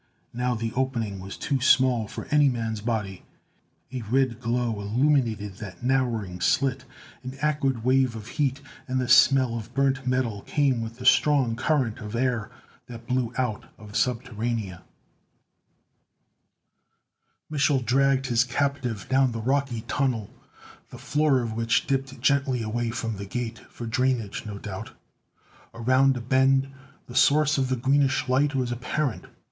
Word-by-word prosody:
Now 125 Hz, +1 st, -1 dB
the 115 Hz, 0 st, -3 dB
opening 120 Hz, -7 st, -2 dB
was 95 Hz, +1 st, -8 dB
too 135 Hz, -3 st, -1 dB
small 130 Hz, -4 st, +4 dB
for -, -, -7 dB
any 150 Hz, -1 st, +5 dB
man's 115 Hz, -3 st, -3 dB
body. 105 Hz, -4 st, -3 dB, 0.7 s
A 130 Hz, -2 st, -4 dB
red 120 Hz, +1 st, 0 dB
glow 120 Hz, -2 st, -1 dB
illuminated 110 Hz, -3 st, 0 dB
that 105 Hz, -3 st, -9 dB
narrowing 115 Hz, -8 st, 0 dB
slit; 130 Hz, +8 st, +1 dB, 0.4 s
an 130 Hz, +1 st, -7 dB
acrid 140 Hz, -5 st, 0 dB
wave 130 Hz, -1 st, +2 dB
of 110 Hz, 0 st, -8 dB
heat, 135 Hz, -1 st, -1 dB, 0.3 s
and 130 Hz, 0 st, -1 dB
the 125 Hz, -, -1 dB
smell 130 Hz, -1 st, +5 dB
of 110 Hz, -2 st, -6 dB
burnt 135 Hz, -1 st, +1 dB
metal 125 Hz, -5 st, 0 dB
came 135 Hz, -3 st, +1 dB
with 115 Hz, +1 st, -6 dB
the 125 Hz, -, -9 dB
strong 130 Hz, -4 st, +4 dB
current 130 Hz, -3 st, 0 dB
of 105 Hz, +1 st, -6 dB
air 120 Hz, -3 st, 0 dB, 0.4 s
that 115 Hz, -1 st, -10 dB
blew 125 Hz, -1 st, -1 dB
out 125 Hz, -5 st, -2 dB
of 105 Hz, -1 st, -12 dB
Subterranea. 115 Hz, -4 st, -2 dB, 2.7 s
Mich'l 140 Hz, -3 st, +1 dB
dragged 135 Hz, +2 st, +2 dB
his 120 Hz, -2 st, +3 dB
captive 125 Hz, -4 st, -2 dB
down 130 Hz, -2 st, +2 dB
the 115 Hz, -, -4 dB
rocky 130 Hz, 0 st, 0 dB
tunnel, 125 Hz, -5 st, -1 dB, 0.6 s
the -, -, -10 dB
floor 150 Hz, -3 st, +1 dB
of 115 Hz, -2 st, -4 dB
which 115 Hz, 0 st, +1 dB
dipped 135 Hz, -1 st, -2 dB
gently 135 Hz, -4 st, +1 dB
away 115 Hz, +2 st, -2 dB
from 115 Hz, -2 st, -3 dB
the 100 Hz, -, -6 dB
Gate; 120 Hz, +2 st, -4 dB
for 120 Hz, -, -8 dB
drainage, 115 Hz, -3 st, -1 dB
no 105 Hz, -1 st, -6 dB
doubt. 100 Hz, -2 st, -7 dB, 0.8 s
Around 130 Hz, +3 st, +3 dB
a -, -, -5 dB
bend, 135 Hz, +2 st, +3 dB, 0.4 s
the 120 Hz, -, -11 dB
source 145 Hz, +3 st, +4 dB
of 130 Hz, -1 st, 0 dB
the 130 Hz, -, +1 dB
greenish 135 Hz, +2 st, +1 dB
light 140 Hz, +3 st, +2 dB
was 125 Hz, -2 st, -1 dB
apparent. 125 Hz, +2 st, -2 dB
125 Hz, 150 wpm, -25 LUFS, 115-135 Hz, 2.7 s, any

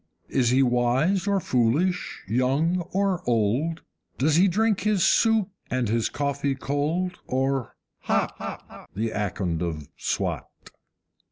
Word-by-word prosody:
Is 125 Hz, -3 st, +2 dB
he 130 Hz, +2 st, +4 dB
wise 130 Hz, +10 st, +2 dB
or 200 Hz, -1 st, +2 dB
foolish, 145 Hz, +6 st, 0 dB
young 135 Hz, -, +1 dB
or 195 Hz, -2 st, +1 dB
old? 120 Hz, +9 st, 0 dB, 0.3 s
Does 150 Hz, +3 st, +2 dB
he 180 Hz, +4 st, +5 dB
drink 210 Hz, +2 st, +1 dB
his 205 Hz, -3 st, +2 dB
soup 225 Hz, -3 st, +3 dB, 0.2 s
and 125 Hz, -3 st, 0 dB
his 115 Hz, 0 st, +1 dB
coffee 140 Hz, -1 st, -1 dB
cold, 155 Hz, +7 st, -2 dB
or 135 Hz, -1 st, -1 dB, 0.3 s
HOT, -, -, -3 dB
The 110 Hz, +2 st, -1 dB
Akond 95 Hz, -5 st, -2 dB
of 80 Hz, -4 st, -4 dB
Swat? -, -, -2 dB
140 Hz, 120 wpm, -25 LUFS, 120-180 Hz, 0.3 s, he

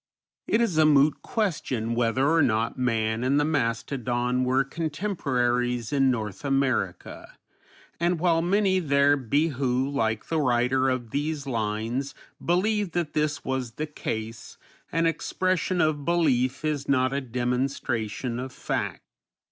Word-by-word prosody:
It 225 Hz, -, +2 dB
is 185 Hz, -9 st, +1 dB
a 155 Hz, -, +6 dB
moot 145 Hz, 0 st, +4 dB
question 135 Hz, -, -2 dB
whether 120 Hz, +3 st, +1 dB
or 165 Hz, +2 st, +4 dB
not 115 Hz, -4 st, +1 dB
man 115 Hz, -3 st, 0 dB
and 135 Hz, +3 st, +2 dB
the 145 Hz, -, +2 dB
mastodon 125 Hz, -2 st, -1 dB
were 130 Hz, +2 st, +2 dB
contemporaries 135 Hz, -, -1 dB
in 135 Hz, -2 st, +3 dB
North 105 Hz, -6 st, -3 dB
America, 135 Hz, -10 st, -1 dB, 0.6 s
and 170 Hz, 0 st, +1 dB
while 165 Hz, -1 st, +3 dB
many 190 Hz, +2 st, +2 dB
there 140 Hz, -3 st, +3 dB
be 145 Hz, +5 st, +1 dB
who, 130 Hz, -1 st, 0 dB
like 115 Hz, -6 st, -1 dB
the 160 Hz, -, -1 dB
writer 130 Hz, +1 st, +2 dB
of 125 Hz, -3 st, -3 dB
these 145 Hz, 0 st, -2 dB
lines, 115 Hz, +2 st, -2 dB, 0.3 s
believe 195 Hz, +1 st, +1 dB
that 170 Hz, -3 st, -2 dB
this 150 Hz, -1 st, -1 dB
was 130 Hz, -3 st, -2 dB
the 155 Hz, -, -3 dB
case, 115 Hz, -6 st, -6 dB, 0.3 s
an 165 Hz, +1 st, +1 dB
expression 185 Hz, +2 st, 0 dB
of 155 Hz, -2 st, +1 dB
belief 140 Hz, -5 st, +1 dB
is 150 Hz, -3 st, -2 dB
not 130 Hz, -1 st, +2 dB
a 140 Hz, -, -1 dB
demonstration 125 Hz, -2 st, -2 dB
of 130 Hz, +1 st, -5 dB
fact. -, -, -3 dB
135 Hz, 140 wpm, -26 LUFS, 120-155 Hz, 0.6 s, a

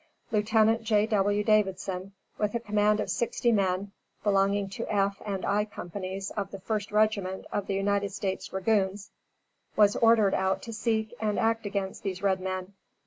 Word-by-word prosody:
Lieutenant 220 Hz, +1 st, +3 dB
J.W. 210 Hz, -2 st, +2 dB
Davidson, 195 Hz, -3 st, 0 dB, 0.3 s
with 210 Hz, +2 st, 0 dB
a -, -, +1 dB
command 210 Hz, -1 st, +2 dB
of -, -, -1 dB
sixty 235 Hz, 0 st, +1 dB
men 195 Hz, -2 st, 0 dB, 0.3 s
belonging 200 Hz, 0 st, +2 dB
to 195 Hz, -, -5 dB
F 200 Hz, -1 st, +1 dB
and 195 Hz, -2 st, -2 dB
I 205 Hz, +1 st, +2 dB
companies 195 Hz, -1 st, -6 dB
of 200 Hz, -2 st, -3 dB
the 195 Hz, -, -7 dB
1st 210 Hz, +2 st, -3 dB
Regiment 210 Hz, -3 st, +1 dB
of 205 Hz, -, -3 dB
United 200 Hz, +1 st, +1 dB
States 190 Hz, -1 st, -3 dB
dragoons, 195 Hz, 0 st, 0 dB, 0.6 s
was 205 Hz, -1 st, +5 dB
ordered 225 Hz, -4 st, +5 dB
out 190 Hz, 0 st, 0 dB
to 230 Hz, -, -6 dB
seek 220 Hz, 0 st, -1 dB
and 210 Hz, -1 st, 0 dB
act 225 Hz, -1 st, +1 dB
against 195 Hz, -1 st, -3 dB
these 190 Hz, -1 st, -4 dB
red 190 Hz, -1 st, +2 dB
men. 185 Hz, +1 st, -4 dB
205 Hz, 155 wpm, -28 LUFS, 195-215 Hz, 0.6 s, was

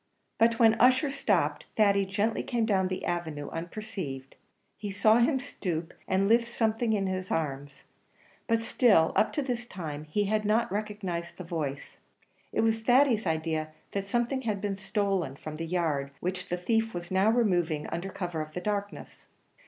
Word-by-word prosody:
But 230 Hz, 0 st, +4 dB
when 225 Hz, -1 st, +5 dB
Ussher 260 Hz, +3 st, +5 dB
stopped, 170 Hz, -, 0 dB
Thady 200 Hz, -2 st, +4 dB
gently 205 Hz, +3 st, 0 dB
came 235 Hz, -3 st, 0 dB
down 190 Hz, -4 st, +2 dB
the 185 Hz, 0 st, -4 dB
avenue 160 Hz, -5 st, -3 dB
unperceived; 165 Hz, -, -6 dB, 0.4 s
he 205 Hz, 0 st, -6 dB
saw 215 Hz, +3 st, +4 dB
him 260 Hz, +3 st, +3 dB
stoop, 175 Hz, -, -4 dB
and 190 Hz, +1 st, +2 dB
lift 235 Hz, +2 st, +4 dB
something 225 Hz, 0 st, +1 dB
in 200 Hz, -2 st, +1 dB
his 185 Hz, -1 st, -3 dB
arms, 145 Hz, -3 st, -3 dB, 0.6 s
but 230 Hz, -1 st, +2 dB
still 210 Hz, -9 st, +4 dB
up 220 Hz, -, +3 dB
to 290 Hz, -, 0 dB
this 245 Hz, -2 st, -3 dB
time 155 Hz, -7 st, -6 dB
he 180 Hz, +7 st, 0 dB
had 215 Hz, +1 st, 0 dB
not 215 Hz, +1 st, +1 dB
recognised 200 Hz, -5 st, -4 dB
the 185 Hz, -, -6 dB
voice. 155 Hz, -5 st, -4 dB, 0.5 s
It -, -, +1 dB
was 225 Hz, 0 st, +2 dB
Thady's 245 Hz, -2 st, +3 dB
idea 160 Hz, -1 st, -1 dB, 0.2 s
that 195 Hz, -1 st, -2 dB
something 240 Hz, +5 st, 0 dB
had 215 Hz, -5 st, -1 dB
been 200 Hz, -1 st, -3 dB
stolen 195 Hz, -7 st, -1 dB
from 155 Hz, +2 st, -7 dB
the 165 Hz, +1 st, -4 dB
yard, 160 Hz, -6 st, 0 dB
which 180 Hz, +1 st, -4 dB
the 180 Hz, -, -1 dB
thief 225 Hz, +4 st, 0 dB
was 175 Hz, +1 st, -6 dB
now 190 Hz, +3 st, +4 dB
removing, 175 Hz, -10 st, +1 dB
under 180 Hz, +3 st, -4 dB
cover 175 Hz, -4 st, -4 dB
of 155 Hz, 0 st, -7 dB
the -, -, -3 dB
darkness. 205 Hz, +1 st, -4 dB
195 Hz, 170 wpm, -29 LUFS, 165-225 Hz, 0.6 s, when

